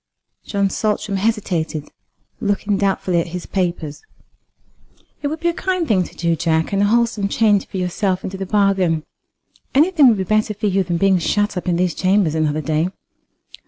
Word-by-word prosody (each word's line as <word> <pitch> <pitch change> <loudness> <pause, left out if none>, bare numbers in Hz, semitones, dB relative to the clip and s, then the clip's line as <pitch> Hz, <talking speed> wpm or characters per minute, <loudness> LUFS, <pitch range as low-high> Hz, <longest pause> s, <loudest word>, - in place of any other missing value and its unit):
John 200 -1 0
Saltram 210 -1 -1
hesitated, 185 -8 -1 0.5
looking 205 0 0
doubtfully 190 -3 +1
at - - -5
his 175 - -8
papers. 170 -5 -3 1.2
"It 290 - -1
would 315 +2 -4
be 345 - +2
only - - -1
a - - -10
kind 365 -3 0
thing 190 -4 +3
to - - -13
do, 170 -1 0
Jack, 160 +1 0
and 200 - +2
a - - +4
wholesome 225 -2 +1
change 205 -1 +2
for 195 - -6
yourself 185 +1 -1
into 195 - -5
the 190 0 -5
bargain. 190 -6 +2 0.7
Anything 305 -1 +5
would 230 -4 +4
be 190 - -1
better 215 +2 0
for 215 +2 -4
you 195 -1 +2
than 175 -1 -2
being 190 +1 +3
shut 205 +4 0
up 180 - -4
in 175 - +2
these 180 -1 +1
chambers 185 -4 +2
another 155 -1 0
day." 155 +3 0
195 Hz, 185 wpm, -20 LUFS, 175-210 Hz, 1.2 s, Anything